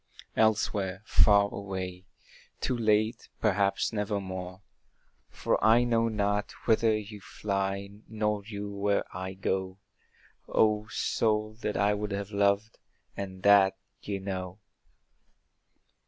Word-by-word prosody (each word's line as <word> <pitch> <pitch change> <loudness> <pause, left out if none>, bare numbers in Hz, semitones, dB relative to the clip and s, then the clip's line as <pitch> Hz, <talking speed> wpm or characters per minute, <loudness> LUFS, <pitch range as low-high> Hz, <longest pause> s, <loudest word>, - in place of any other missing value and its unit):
Elsewhere, 105 -3 +1
far 100 -1 +4
away... 95 -1 -5 0.5
too 130 - -1
late, 110 0 +1
perhaps 100 0 +1
never 105 -1 -1
more, 95 0 -7 0.7
For - - -1
I 115 +2 +6
know 115 -1 +2
not 105 -1 -1
whither 110 -1 +3
you 105 -1 -8
fly, 100 0 -2 0.2
nor 105 -2 -1
you, 105 -1 -6
where 100 0 +1
I 95 +1 -5
go, 95 -1 -2 0.7
O 105 -1 +2
soul 110 -1 0
that 105 - -2
I 105 0 +3
would 105 0 -3
have 100 +1 -4
loved, 100 +2 +1 0.4
and 95 -1 -6
that 100 -1 +6 0.2
you 100 -1 -4
know! 95 -1 -5
100 Hz, 115 wpm, -29 LUFS, 95-110 Hz, 0.7 s, I